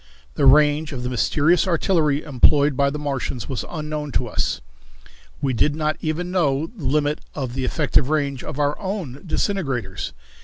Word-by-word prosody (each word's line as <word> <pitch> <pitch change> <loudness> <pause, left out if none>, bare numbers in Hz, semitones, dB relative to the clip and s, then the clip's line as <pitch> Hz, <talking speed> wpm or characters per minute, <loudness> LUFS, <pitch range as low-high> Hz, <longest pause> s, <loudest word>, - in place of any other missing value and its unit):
The 135 - +2
range 150 +2 +4
of 125 -2 -5
the 125 - -2
mysterious 155 +8 +2
artillery 160 -4 +2
employed 145 0 +4
by 140 +1 +3
the 145 - -4
Martians 135 -5 -3
was 130 - -3
unknown 150 -2 -4
to 125 - +1
us. - - -1 0.8
We 135 -2 +1
did 145 +5 +2
not 155 0 0
even 170 +3 -2
know 150 -5 +1
the 170 -10 -8
limit 145 +2 +1 0.2
of 130 -4 -3
the 130 0 -2
effective 140 -1 +1
range 140 -4 0
of - - -6
our 145 0 +1
own 185 -9 -4
disintegrators. 125 - -2
145 Hz, 165 wpm, -22 LUFS, 135-155 Hz, 0.8 s, range